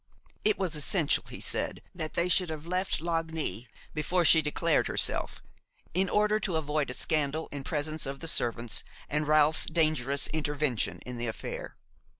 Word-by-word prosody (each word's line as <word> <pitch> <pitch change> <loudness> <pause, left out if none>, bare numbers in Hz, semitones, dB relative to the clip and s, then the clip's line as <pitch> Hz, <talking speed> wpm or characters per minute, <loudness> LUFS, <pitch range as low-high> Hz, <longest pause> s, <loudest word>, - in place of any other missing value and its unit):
It 215 -1 +3
was 185 -4 -1
essential, 150 +1 +2
he - - -8
said, - - -1
that 155 -3 -5
they 170 - +2
should 180 -1 +2
have 155 -1 -6
left 185 -1 -1
Lagny 160 -7 -2 0.3
before 170 +3 +1
she 160 +1 +7
declared 155 +2 +1
herself, - - 0 0.5
in 185 +2 +2
order 210 +1 +3
to 190 -6 -2
avoid 150 -2 0
a 125 - -1
scandal 155 0 0
in 145 -1 -5
presence 155 -1 -1
of 135 0 -5
the 165 - -6
servants, 120 -5 0 0.3
and 150 +1 -1
Ralph's 155 +1 +4
dangerous 155 -4 +2
intervention 145 -5 -1
in 125 -1 -6
the 120 0 -2
affair. 110 - -5
155 Hz, 160 wpm, -29 LUFS, 145-170 Hz, 0.5 s, she